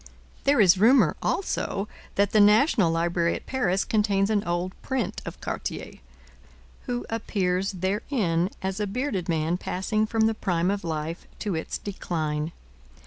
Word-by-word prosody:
There 280 -2 +4
is 190 -3 +6
rumour, 240 +7 +5
also, 205 - -1 0.3
that 200 0 +2
the 215 - +4
National 210 - +5
Library 170 +1 +1
at - - -7
Paris 195 -8 0
contains 205 -1 +2
an 205 -2 +2
old 175 +1 -1
print 265 -3 -2
of - - -7
Cartier, - - -5 0.9
who 245 0 -2
appears 195 -4 -1
therein 190 - 0
as 190 +1 -2
a 210 - 0
bearded 200 -5 -2
man 165 +2 0
passing 215 +4 -1
from 225 0 0
the 220 0 +4
prime 180 -3 0
of 200 -2 -3
life 160 0 -4
to 205 - -1
its 160 - -3
decline. 155 -5 -3
195 Hz, 145 wpm, -26 LUFS, 175-215 Hz, 0.9 s, is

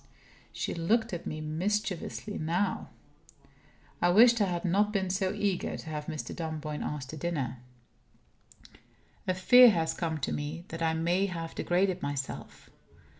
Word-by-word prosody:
She - - -3
looked 220 +6 +1
at 175 - -5
me 155 0 -4
mischievously 195 +5 -2
now. 175 +5 -1 1.1
I 175 - +4
wished 230 +4 +6
I - - +5
had 175 -1 -2
not 205 +4 +2
been 190 -3 0
so 190 0 0
eager 200 -3 -1
to 160 - -8
have 150 -1 -5
Mr. 155 -2 -5
Dunboyne 155 -2 -4
asked 140 -2 -4
to 155 - -7
dinner. 140 -7 -2 1.7
A 185 - +1
fear 245 +6 +8
has 165 -6 +1
come 165 -2 -2
to - - -1
me 150 +4 -4
that 165 +1 -6
I 160 -1 +1
may 175 +4 +1
have 165 -3 -5
degraded 185 +1 +1
myself. 140 -1 -5
175 Hz, 150 wpm, -30 LUFS, 155-195 Hz, 1.7 s, fear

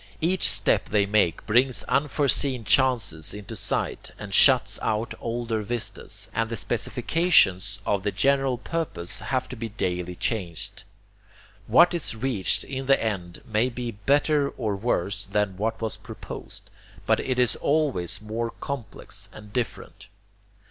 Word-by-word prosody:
Each 180 +4 +5
step - - +4
they 105 -1 +2
make 100 -5 +1
brings 125 +4 +3
unforeseen 140 -3 +1
chances 105 - +1
into 105 -3 -8
sight, - - -2
and - - -8
shuts - - +5
out 110 +2 -1
older 115 -1 -2
vistas, 120 +2 -4
and 115 0 -1
the 115 - -3
specifications 110 - +2
of 100 -2 0
the 105 - -1
general 135 0 +2
purpose 125 - -4
have 130 -1 -2
to 130 - -6
be 115 -1 -5
daily 90 -4 -3
changed. 90 -4 -3 0.8
What 175 +2 +6
is 165 -9 -1
reached 110 -6 +1
in 135 -1 -5
the 135 - +5
end 95 -6 -4
may 110 +2 +1
be 120 -1 -5
better 140 +6 +1
or 110 -5 -3
worse 100 -2 -1
than 100 -1 -1
what 110 +2 -2
was 110 -1 -3
proposed, - - -9 0.3
but - - +2
it 130 -1 -2
is 125 -2 +2
always 140 - 0
more 115 +2 -3
complex 140 -5 -6
and 105 -1 -13
different. 120 -4 -4
115 Hz, 140 wpm, -25 LUFS, 100-130 Hz, 0.8 s, What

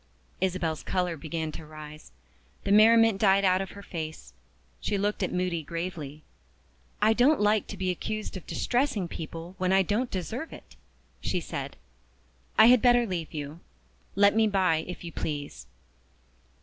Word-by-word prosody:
Isabel's 180 -4 -1
color 180 -2 -1
began 160 0 -4
to 155 - -8
rise. 155 - -11 0.5
The 200 - -1
merriment 225 0 +6
died 200 -1 +4
out 185 0 +3
of 195 - -6
her 200 - -9
face; 160 -4 -7 0.5
she 205 - -1
looked 205 +1 -1
at 185 - 0
Moody 180 -2 -1
gravely. 155 -2 -6 0.8
"I 220 +1 +5
don't 260 +6 +4
like 210 0 +2
to - - -7
be 185 -1 0
accused 215 +4 -4
of 185 - -8
distressing 245 -7 0
people 165 +2 -7
when 185 0 +1
I 190 0 +5
don't 220 +7 -1
deserve 220 - -4
it," - - -13 0.5
she - - -1
said. - - -5 0.8
"I 220 - +9
had 245 0 +7
better 245 -1 +5
leave 175 -6 -4
you. 150 +1 -6 0.6
Let 200 +1 +5
me 220 0 +4
by, 190 -5 +2
if 180 - -7
you 170 - -6
please." 145 - -5
185 Hz, 160 wpm, -28 LUFS, 165-210 Hz, 0.8 s, I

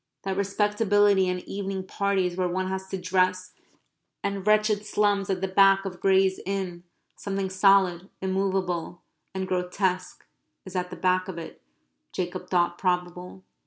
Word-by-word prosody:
That 195 -1 -2
respectability 205 -1 +2
and 180 0 -2
evening 195 -1 -4
parties 190 -2 0
where 185 0 0
one 185 +1 -2
has 190 0 -4
to 190 - -4
dress, 185 0 0 0.7
and 200 0 -3
wretched 215 0 +3
slums 205 -2 +1
at 185 -2 -1
the 190 - 0
back 195 +1 +4
of 180 -2 -6
Gray's 190 -1 +3
Inn 185 -3 -3 0.3
something 195 -1 -3
solid, 190 -2 +3
immovable, 190 -3 -2 0.3
and 190 0 -2
grotesque 185 0 -2 0.4
is 185 0 -10
at 180 0 -1
the 180 - -7
back 185 0 +1
of 185 -3 -6
it, 165 - -9 0.5
Jacob 180 0 -4
thought 175 -1 +1
probable. 180 0 -2
190 Hz, 145 wpm, -26 LUFS, 180-195 Hz, 0.7 s, back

